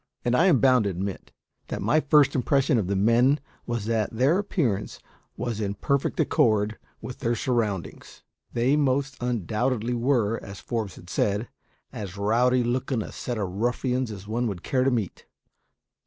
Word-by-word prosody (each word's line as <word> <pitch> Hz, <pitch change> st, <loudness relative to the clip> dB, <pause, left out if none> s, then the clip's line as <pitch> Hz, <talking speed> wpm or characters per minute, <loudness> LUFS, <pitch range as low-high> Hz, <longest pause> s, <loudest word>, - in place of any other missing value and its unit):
And 120 Hz, 0 st, +2 dB
I 170 Hz, +8 st, +4 dB
am 165 Hz, -9 st, +5 dB
bound 130 Hz, -4 st, +4 dB
to -, -, +1 dB
admit 95 Hz, +1 st, -5 dB, 0.4 s
that -, -, -4 dB
my 155 Hz, -, +2 dB
first 150 Hz, -2 st, +4 dB
impression 135 Hz, 0 st, +2 dB
of 95 Hz, -, -2 dB
the 100 Hz, -, 0 dB
men 120 Hz, +8 st, +4 dB, 0.3 s
was 120 Hz, -3 st, -2 dB
that 110 Hz, -2 st, 0 dB
their 135 Hz, -, +2 dB
appearance 135 Hz, -, -1 dB, 0.4 s
was 115 Hz, -2 st, -3 dB
in 100 Hz, -1 st, -2 dB
perfect 140 Hz, -, -1 dB
accord 110 Hz, -7 st, +2 dB, 0.2 s
with 125 Hz, -, -7 dB
their 120 Hz, -3 st, 0 dB
surroundings. 110 Hz, -7 st, -3 dB, 0.3 s
They 125 Hz, +4 st, +2 dB
most 140 Hz, -1 st, +1 dB
undoubtedly 120 Hz, +1 st, -1 dB
were, 120 Hz, -3 st, +1 dB
as 100 Hz, 0 st, -9 dB
Forbes 110 Hz, -5 st, -4 dB
had 85 Hz, -, -14 dB
said, 105 Hz, +5 st, -1 dB, 0.4 s
as 100 Hz, -3 st, -6 dB
rowdy 120 Hz, +5 st, +2 dB
looking 125 Hz, -1 st, -1 dB
a -, -, -9 dB
set 120 Hz, -2 st, -4 dB
of 100 Hz, -4 st, -2 dB
ruffians 125 Hz, +5 st, -1 dB
as 100 Hz, -2 st, -8 dB
one 120 Hz, +3 st, -1 dB
would 95 Hz, -5 st, -5 dB
care 130 Hz, -1 st, +1 dB
to 135 Hz, -, +3 dB
meet. 115 Hz, -7 st, -3 dB
120 Hz, 170 wpm, -26 LUFS, 105-130 Hz, 0.4 s, am